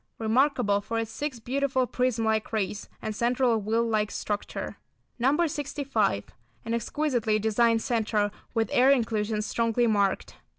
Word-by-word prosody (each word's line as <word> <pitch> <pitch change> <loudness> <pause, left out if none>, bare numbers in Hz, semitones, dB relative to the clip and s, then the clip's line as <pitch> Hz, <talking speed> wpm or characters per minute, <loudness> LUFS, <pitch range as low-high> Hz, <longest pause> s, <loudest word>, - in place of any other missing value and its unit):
Remarkable 225 -2 +2
for 230 +3 -3
its 225 -1 -2
six 285 -5 -4
beautiful 260 +2 0
prism 250 -2 0
like 220 -1 0
rays, 210 -2 -2
and 215 - -3
central 240 -1 +2
wheel 225 +3 +1
like 215 -2 +1
structure. 205 -1 -4 0.4
No. 280 +8 +3
65. 275 - -1 0.4
An 225 - -2
exquisitely 235 -3 0
designed 225 +1 +2
centre, 215 -3 0 0.2
with 225 -2 0
air 255 +2 +5
inclusions 220 -5 +1
strongly 230 +1 +1
marked. 200 -4 0
230 Hz, 135 wpm, -27 LUFS, 215-255 Hz, 0.4 s, air